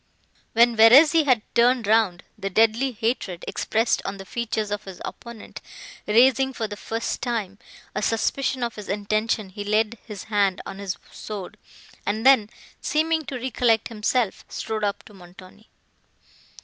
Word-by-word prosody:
When 235 +1 +5
Verezzi 290 +9 +7
had 250 -6 +3
turned 240 0 +3
round, 205 -4 +2
the 195 -1 -4
deadly 225 +6 +2
hatred, 225 -6 -3
expressed 225 +2 0
on 195 0 -5
the 195 - -9
features 220 -2 -3
of 205 0 -3
his 190 -2 -9
opponent, 235 -3 -9 0.5
raising, 260 +4 +4
for 225 -3 -3
the 205 - -7
first 225 +2 -4
time, 215 -5 -3 0.3
a 210 - -2
suspicion 245 +4 0
of 235 -1 -2
his 210 -2 -9
intention, 215 +1 -1
he 205 +2 -7
laid 215 +2 0
his 210 -4 -8
hand 200 -3 +1
on 195 - -8
his 190 -3 -4
sword, 205 -2 -7 0.5
and 215 +3 -2
then, 260 -6 +6 0.3
seeming 315 0 0
to 275 - -6
recollect 240 -3 +1
himself, 225 0 -1
strode 220 -1 -4
up 200 -1 -1
to 210 - -16
Montoni. 185 +3 -16
220 Hz, 150 wpm, -24 LUFS, 205-240 Hz, 0.5 s, Verezzi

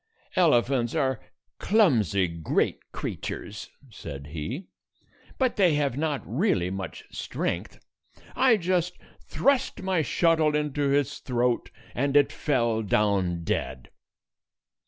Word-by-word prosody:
"Elephants 130 -7 +3
are 135 -6 +1 0.4
clumsy 115 - +3
great 85 -2 -1
creatures," 100 0 -5 0.2
said 70 -7 -8
he; 110 - -5 0.7
"but 260 -2 +1
they 180 -6 +4
have 140 -4 0
not 150 -1 -1
really 110 - 0
much 95 0 -6
strength. - - -3 0.6
I 255 -3 +5
just 180 -1 0 0.3
thrust 270 -7 0
my 185 -3 +1
shuttle 160 0 +2
into 145 -1 0
its 140 0 +1
throat, 125 -1 0 0.2
and 140 +3 +2
it 145 - +4
fell 120 -6 0
down 100 -5 +1
dead." 65 -5 -3
140 Hz, 110 wpm, -26 LUFS, 105-165 Hz, 0.7 s, I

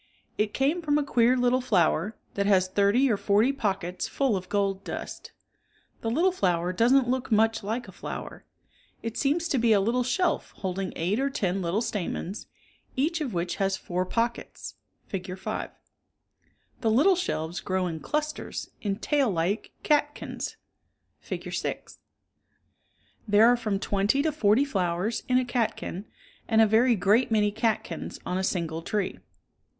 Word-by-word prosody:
It 210 0 0
came 290 +9 +1
from 295 -2 +2
a 300 - +1
queer 250 -2 +3
little 250 +1 +2
flower, 195 -2 +1 0.2
that 200 0 0
has 190 -2 +4
thirty 200 +8 +3
or 210 - +2
forty 210 +7 +3
pockets 190 -7 -2
full 270 -6 +1
of 185 -1 -5
gold 195 -1 0
dust - - -7 0.7
The 225 - -1
little 335 +11 +3
flower 180 - 0
doesn't 245 +6 +4
look 255 0 -1
much 225 +1 +3
like 225 +4 -3
a - - -10
flower. - - -7 0.6
It 230 0 -4
seems 310 +4 +1
to 270 - +1
be 230 -1 +4
a 205 - +5
little 230 +6 +1
shelf 335 +9 0
holding 190 0 -3
eight 185 +8 0
or 275 +1 +1
ten 195 -7 -1
little 185 +6 0
stamens, 195 -1 -4 0.5
each 315 +5 0
of 255 -10 -3
which 175 +1 -2
has 195 -1 +1
four 180 +1 -2
pockets 235 +3 -3 0.3
{Fig, 185 -1 -5
5). - - -4 1.1
The 225 - +1
little 290 - +5
shelves 175 - -2
grow 185 -1 -1
in 165 -2 -3
clusters, 300 - -3
in 200 -2 -1
tail 280 +3 +1
like 185 +3 -1
catkins 295 0 0 0.6
(Fig. - - -6
6). - - -4 1.3
There 210 +1 +6
are 245 +1 +6
from 215 -4 -1
twenty 205 +7 +1
to 315 - +1
forty 230 -1 +3
flowers 190 -3 -1
in 255 - +3
a 255 - +2
catkin 225 -5 -2 0.4
and 220 -1 +3
a 225 - +8
very 230 +3 +4
great 210 +6 +3
many 210 -2 +2
catkins 220 0 -2
on 180 - -1
a - - -1
single 165 -4 -1
tree. 200 +3 -2
215 Hz, 160 wpm, -27 LUFS, 190-255 Hz, 1.3 s, a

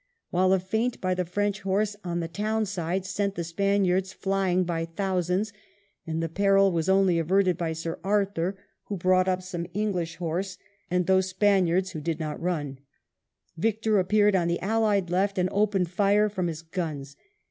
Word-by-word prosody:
While 185 +1 +3
a 190 - +5
feint 220 +6 -1
by 185 -1 0
the 180 0 -1
French 205 +3 -1
horse 200 +2 0
on 175 -1 -2
the 165 - -3
town 215 +5 -1
side 185 -1 -2
sent 200 +1 -2
the 170 - -2
Spaniards 190 +1 +1
flying 190 -1 0
by 165 -2 -2
thousands, 185 +3 -1 0.5
and 165 0 -2
the - - 0
peril 195 +3 +3
was 165 +1 -1
only 190 -3 +4
averted 185 +2 +2
by 165 -1 -2
Sir 165 +1 -5
Arthur, 195 -2 0 0.3
who 200 - -4
brought 185 +1 +3
up 185 0 0
some 175 -2 -5
English 185 -6 -1
horse 180 +3 -3 0.3
and 180 0 +1
those 190 0 +3
Spaniards 185 -2 +2
who 155 -3 -6
did 160 +1 -2
not 155 -2 -4
run, 150 -6 -2 0.8
Victor 220 +2 +1
ap 185 0 -1
peared 210 -1 +4
on 175 -2 +2
the 170 0 0
allied 205 -3 +1
left^ 195 +3 0
and 180 0 +1
opened 195 -4 +1
fire 205 +2 +3
from 185 -4 -2
his 165 -1 -5
guns. 155 -5 -5
185 Hz, 180 wpm, -26 LUFS, 170-200 Hz, 0.8 s, a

